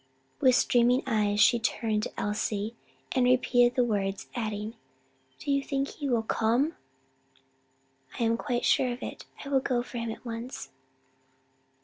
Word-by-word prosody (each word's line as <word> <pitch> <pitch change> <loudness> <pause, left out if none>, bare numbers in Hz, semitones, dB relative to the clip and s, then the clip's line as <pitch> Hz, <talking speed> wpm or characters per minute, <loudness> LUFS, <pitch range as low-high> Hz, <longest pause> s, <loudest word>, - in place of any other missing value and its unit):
With 255 -1 +5
streaming 245 0 +3
eyes 210 -4 +1
she 235 +2 +6
turned 220 -1 0
to - - -5
Elsie 210 +1 -2 0.4
and 255 - +2
repeated 245 -1 +4
the 250 - +4
words, 200 -4 -1
adding, 215 -2 -3 0.6
"Do 285 - -3
you 275 0 +2
think 275 0 -2
he 285 -3 -5
would 225 -3 0
come?" 240 +8 +1 1.4
"I - - +1
am 230 0 +3
quite 245 0 -2
sure 255 - +3
of 245 +2 -6
it. - - -7 0.2
I - - -6
will 275 -1 +3
go 250 -2 0
for 245 -1 -6
him 230 0 -3
at 225 - -7
once." 235 +2 -6
240 Hz, 155 wpm, -28 LUFS, 220-255 Hz, 1.4 s, she